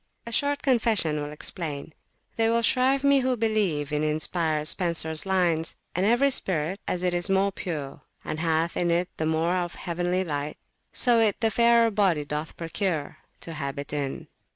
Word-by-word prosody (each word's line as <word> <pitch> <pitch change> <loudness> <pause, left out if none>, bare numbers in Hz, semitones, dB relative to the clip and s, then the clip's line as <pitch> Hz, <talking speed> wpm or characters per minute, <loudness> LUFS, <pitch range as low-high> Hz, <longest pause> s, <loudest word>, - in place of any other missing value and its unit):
A 235 - -7
short 285 +4 +1
confession 220 - +2
will 145 0 -5
explain. 150 -1 -4 0.4
They 225 0 +2
will 230 0 +1
shrive 265 +3 +3
me 280 -1 +4
who 255 -1 0
believe 200 -10 0
in 150 0 0
inspired 155 0 0
Spensers 165 -1 +1
lines 175 -4 +1 0.2
And 185 +3 0
every 255 +5 +3
spirit, 180 - +1
as 180 0 -2
it 180 -1 +1
is 175 +1 +3
more 195 +1 +2
pure, 150 -8 -6 0.2
And 155 - -4
hath 165 0 0
in 175 - 0
it 175 +2 0
the 160 - -1
more 160 +2 +1
of 175 -1 -3
heavenly 175 +1 -2
light, 150 -3 -4 0.3
So 240 -3 +4
it 215 -3 +1
the 225 -1 +1
fairer 235 +1 +4
body 190 -8 +1
doth 150 +2 -5
procure 165 -2 -3 0.2
To 165 - -6
habit 140 -1 -5
in. 140 -2 -3
175 Hz, 175 wpm, -25 LUFS, 155-220 Hz, 0.4 s, me